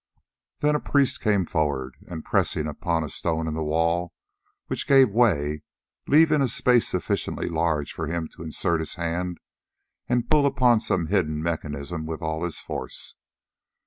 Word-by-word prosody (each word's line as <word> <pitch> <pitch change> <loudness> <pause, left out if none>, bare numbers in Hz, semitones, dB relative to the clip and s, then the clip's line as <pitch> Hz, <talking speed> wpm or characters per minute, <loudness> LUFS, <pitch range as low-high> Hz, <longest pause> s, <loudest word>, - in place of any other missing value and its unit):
Then 150 0 +3
a 150 - +1
priest 140 -2 +1
came 100 -5 +2
forward, 70 -6 -1
and 80 -3 -7
pressed - - +1
upon 80 +2 -1
a - - -4
stone 80 +2 -1
in 80 - -2
the 80 - -3
wall, 85 +3 0 0.5
which - - -3
gave 135 -5 +6
way, 75 -10 +2 0.5
leaving 155 0 +5
a 135 - +3
space 125 0 +3
sufficiently - - -2
large 80 -3 0
for 80 - -4
him 80 0 -2
to - - -15
insert 85 +1 -1
his 80 - -3
hand 85 +1 -3 0.7
and 120 -1 +1
pull 150 -2 +4
upon 125 -4 +4
some 90 -5 0
hidden 80 -4 0
mechanism 80 -1 -4
with 80 -1 -5
all 80 +1 -2
his 85 -2 -1
force. - - -4
85 Hz, 160 wpm, -25 LUFS, 80-115 Hz, 0.7 s, gave